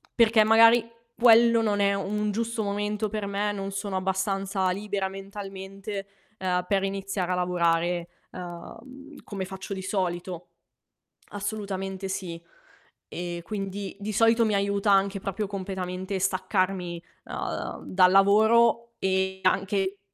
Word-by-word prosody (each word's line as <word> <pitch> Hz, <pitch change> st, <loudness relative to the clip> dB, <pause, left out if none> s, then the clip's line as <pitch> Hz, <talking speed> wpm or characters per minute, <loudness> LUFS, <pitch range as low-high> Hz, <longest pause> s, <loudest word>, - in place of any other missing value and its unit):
perché 225 Hz, -2 st, +5 dB
magari 225 Hz, +1 st, +6 dB, 0.3 s
quello 230 Hz, 0 st, +6 dB
non 210 Hz, -2 st, +1 dB
è 200 Hz, 0 st, +3 dB
un 210 Hz, +1 st, -1 dB
giusto 230 Hz, +1 st, -2 dB
momento 205 Hz, +1 st, -2 dB
per 210 Hz, -1 st, -3 dB
me, 200 Hz, +1 st, -1 dB
non 195 Hz, -1 st, -4 dB
sono 200 Hz, 0 st, -4 dB
abbastanza 190 Hz, 0 st, 0 dB
libera 200 Hz, 0 st, -2 dB
mentalmente, 195 Hz, 0 st, -7 dB, 0.3 s
ehm, 180 Hz, -2 st, -1 dB
per 195 Hz, 0 st, +1 dB
iniziare 195 Hz, -1 st, -2 dB
a -, -, +1 dB
lavorare, 175 Hz, -1 st, +1 dB, 0.2 s
ehm, 250 Hz, -, -10 dB
come 195 Hz, -2 st, -4 dB
faccio 190 Hz, +1 st, -7 dB
di 190 Hz, -, -5 dB
solito. 180 Hz, -2 st, -3 dB, 0.8 s
Assolutamente 195 Hz, -2 st, -4 dB
sì. 175 Hz, -3 st, -4 dB, 0.7 s
Ehm, 175 Hz, 0 st, -5 dB
quindi, 195 Hz, 0 st, -5 dB
di 210 Hz, +2 st, -3 dB
solito 225 Hz, +2 st, +4 dB
mi 215 Hz, -, +1 dB
aiuta 200 Hz, +1 st, +1 dB
anche 195 Hz, 0 st, +3 dB
proprio 200 Hz, +2 st, -3 dB
completamente 190 Hz, -1 st, -4 dB
staccarmi, 185 Hz, -2 st, -1 dB, 0.2 s
uhm, -, -, -5 dB
dal 185 Hz, -1 st, +5 dB
lavoro, 220 Hz, +4 st, +4 dB
e 190 Hz, 0 st, 0 dB
anche 195 Hz, +1 st, +1 dB
195 Hz, 125 wpm, -26 LUFS, 190-210 Hz, 0.8 s, magari